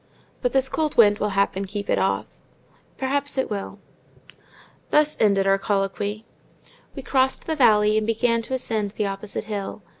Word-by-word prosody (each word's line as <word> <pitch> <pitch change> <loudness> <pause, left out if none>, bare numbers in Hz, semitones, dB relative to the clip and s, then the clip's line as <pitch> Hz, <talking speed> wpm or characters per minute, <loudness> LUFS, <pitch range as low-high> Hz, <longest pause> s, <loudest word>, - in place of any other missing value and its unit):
"But 250 - 0
this 265 -1 +2
cold 305 +3 -2
wind 205 -3 +6
will 210 - 0
happen 200 0 +1
keep 200 +1 -5
it - - +1
off." - - 0 0.7
"Perhaps 280 +1 -2
it 265 - -1
will." 200 -1 -4 1.1
Here 300 0 +5
ended 200 -3 +3
our 195 0 +3
colloquy. 205 +2 -2 0.7
We 275 - -6
crossed 265 0 +1
the 320 - -1
valley, 215 -5 +4
and 215 - -4
began 230 +1 +1
to 260 +3 -3
ascend 220 -5 -2
the 210 - 0
opposite 200 +1 -4
hill. 210 -1 -5
215 Hz, 160 wpm, -23 LUFS, 200-260 Hz, 1.1 s, wind